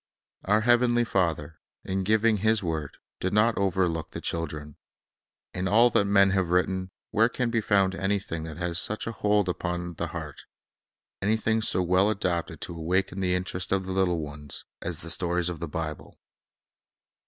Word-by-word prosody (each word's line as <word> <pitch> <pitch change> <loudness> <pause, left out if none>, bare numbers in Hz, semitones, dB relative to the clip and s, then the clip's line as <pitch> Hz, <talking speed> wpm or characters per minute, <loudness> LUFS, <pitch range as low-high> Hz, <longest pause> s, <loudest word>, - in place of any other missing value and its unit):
Our 105 +2 +3
heavenly 120 +1 +4
Father, 85 -7 -1 0.3
in 95 0 -1
giving 110 +2 +3
His 110 +1 +2
word, 80 -4 -3 0.2
did 95 - -2
not 110 +2 +4
overlook 90 -4 0
the - - -7
children. 75 -3 -4 0.8
In 90 +1 -2
all 115 +5 +5
that 100 - +3
men 100 -1 +4
have 95 -3 +1
written, 95 +1 +1 0.2
where 110 +2 +4
can 125 -1 -1
be 115 -1 +1
found 100 -3 +2
anything 95 -3 -2
that 80 -2 -8
has 85 -1 -1
such 110 +4 -1
a 115 - -3
hold 105 -2 +1
upon 90 -1 -3
the - - -3
heart, - - -7 0.8
anything 110 +2 +1
so 95 -4 +1
well 90 +3 +3
adapted 90 -5 -2
to 85 - -6
awaken 90 +4 -1
the 90 -1 +1
interest 90 0 -1
of 95 -1 +1
the 95 - -4
little 95 -2 +2
ones, 75 -1 -7 0.2
as 85 -2 -3
the 85 - -6
stories 90 +1 0
of 85 -3 -5
the 85 - -4
Bible? 75 0 -6
95 Hz, 170 wpm, -27 LUFS, 85-105 Hz, 0.8 s, all